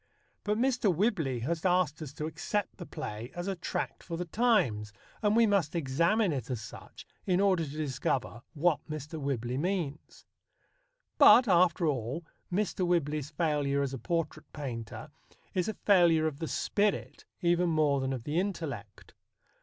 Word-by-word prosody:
But 210 Hz, +1 st, 0 dB
Mr. 250 Hz, -4 st, +2 dB
Whibley 165 Hz, -, 0 dB
has 160 Hz, +6 st, -2 dB
asked 180 Hz, -4 st, +2 dB
us 150 Hz, -4 st, -6 dB
to 150 Hz, -, -4 dB
accept 175 Hz, +6 st, -3 dB
the 175 Hz, -, -8 dB
play 120 Hz, -7 st, -6 dB
as 175 Hz, +2 st, -4 dB
a 195 Hz, -, -1 dB
tract 175 Hz, -, -4 dB
for 170 Hz, -2 st, -5 dB
the 180 Hz, -, -3 dB
times, 170 Hz, -, +1 dB, 0.3 s
and 210 Hz, 0 st, +2 dB
we 230 Hz, 0 st, +6 dB
must 195 Hz, -7 st, +1 dB
examine 170 Hz, +7 st, +2 dB
it 130 Hz, -3 st, -4 dB
as 125 Hz, -4 st, -2 dB
such 105 Hz, -, -11 dB, 0.2 s
in 180 Hz, -1 st, +3 dB
order 190 Hz, -4 st, +3 dB
to 150 Hz, -, -5 dB
discover 130 Hz, -4 st, -2 dB
what 160 Hz, +1 st, +2 dB
Mr. 155 Hz, +1 st, -6 dB
Whibley 125 Hz, -2 st, -2 dB
means. 165 Hz, -4 st, -3 dB, 0.9 s
But, 245 Hz, 0 st, +8 dB
after 180 Hz, -2 st, +4 dB
all, 140 Hz, +2 st, -2 dB, 0.3 s
Mr. 195 Hz, 0 st, 0 dB
Whibley's 155 Hz, -5 st, 0 dB
failure 145 Hz, -3 st, 0 dB
as 135 Hz, -1 st, -3 dB
a 135 Hz, -, -4 dB
portrait 165 Hz, +5 st, -3 dB
painter 120 Hz, -7 st, -6 dB, 0.4 s
is 180 Hz, -2 st, 0 dB
a 220 Hz, -, -2 dB
failure 170 Hz, -5 st, +4 dB
of 150 Hz, -3 st, -2 dB
the 160 Hz, -, -3 dB
spirit 205 Hz, +4 st, -1 dB, 0.2 s
even 175 Hz, 0 st, +3 dB
more 150 Hz, -4 st, +2 dB
than 130 Hz, 0 st, -1 dB
of 130 Hz, -4 st, -4 dB
the 150 Hz, +6 st, 0 dB
intellect. 150 Hz, -, -5 dB
160 Hz, 160 wpm, -30 LUFS, 140-185 Hz, 0.9 s, But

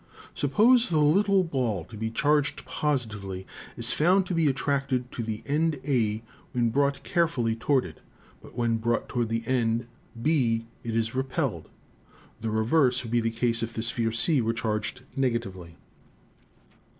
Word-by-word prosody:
Suppose 230 Hz, -, +4 dB
the 160 Hz, -, +1 dB
little 190 Hz, +6 st, +4 dB
ball 125 Hz, -, -1 dB
to 110 Hz, -, -12 dB
be 110 Hz, +1 st, -3 dB
charged 145 Hz, +5 st, +1 dB
positively, 110 Hz, -10 st, -2 dB
it -, -, -17 dB, 0.3 s
is 115 Hz, -, +1 dB
found 185 Hz, +5 st, +3 dB
to 185 Hz, -, -3 dB
be 165 Hz, -2 st, +2 dB
attracted 135 Hz, -2 st, 0 dB
to -, -, -4 dB
the 110 Hz, -1 st, -4 dB
end 155 Hz, +1 st, 0 dB
A 110 Hz, -5 st, +1 dB, 0.3 s
when 120 Hz, -2 st, +1 dB
brought 140 Hz, +2 st, +1 dB
carefully 160 Hz, -10 st, +1 dB
toward 130 Hz, +2 st, +1 dB
it, 80 Hz, -, -10 dB, 0.4 s
but -, -, -15 dB
when 115 Hz, -2 st, +1 dB
brought 115 Hz, +1 st, -1 dB
toward 120 Hz, -3 st, -1 dB
the 115 Hz, 0 st, -1 dB
end 115 Hz, -2 st, +1 dB, 0.3 s
B 115 Hz, -5 st, +1 dB, 0.2 s
it 115 Hz, -1 st, -3 dB
is 115 Hz, -1 st, 0 dB
repelled. 130 Hz, 0 st, -2 dB, 0.7 s
The 110 Hz, -, -2 dB
reverse 125 Hz, +4 st, +2 dB
would 115 Hz, -, -7 dB
be 120 Hz, 0 st, +3 dB
the 115 Hz, -, 0 dB
case 115 Hz, 0 st, 0 dB
if 115 Hz, 0 st, -4 dB
the 110 Hz, -, -2 dB
sphere 115 Hz, -1 st, -1 dB
C 130 Hz, +5 st, +2 dB
were 115 Hz, 0 st, 0 dB
charged 110 Hz, 0 st, -2 dB
negatively. 100 Hz, -10 st, -2 dB
120 Hz, 160 wpm, -27 LUFS, 115-145 Hz, 0.7 s, Suppose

